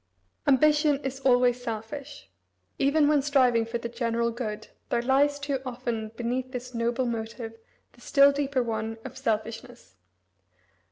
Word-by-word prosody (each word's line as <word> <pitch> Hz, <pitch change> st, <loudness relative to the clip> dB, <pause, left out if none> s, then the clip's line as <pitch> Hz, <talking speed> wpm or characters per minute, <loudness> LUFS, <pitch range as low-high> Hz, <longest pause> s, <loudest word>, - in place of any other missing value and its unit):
Ambition 295 Hz, +1 st, +4 dB
is 270 Hz, 0 st, -3 dB
always 245 Hz, -2 st, +3 dB
selfish. 245 Hz, -, -7 dB, 0.5 s
Even 290 Hz, +2 st, +3 dB
when 295 Hz, -1 st, +4 dB
striving 255 Hz, -5 st, +3 dB
for 235 Hz, +1 st, -2 dB
the 235 Hz, -, -5 dB
general 235 Hz, 0 st, -1 dB
good 220 Hz, -3 st, -5 dB, 0.2 s
there 235 Hz, -, 0 dB
lies, 280 Hz, +3 st, +3 dB
too 280 Hz, -2 st, -2 dB
often, 240 Hz, -3 st, -4 dB
beneath 250 Hz, +2 st, -2 dB
this 250 Hz, 0 st, -6 dB
noble 235 Hz, +2 st, 0 dB
motive 225 Hz, 0 st, -4 dB, 0.4 s
the 240 Hz, -, -21 dB
still 280 Hz, +2 st, +5 dB
deeper 280 Hz, -2 st, 0 dB
one 225 Hz, -1 st, -3 dB
of 260 Hz, -1 st, -7 dB
selfishness. 230 Hz, -, -4 dB
245 Hz, 135 wpm, -27 LUFS, 230-275 Hz, 0.5 s, still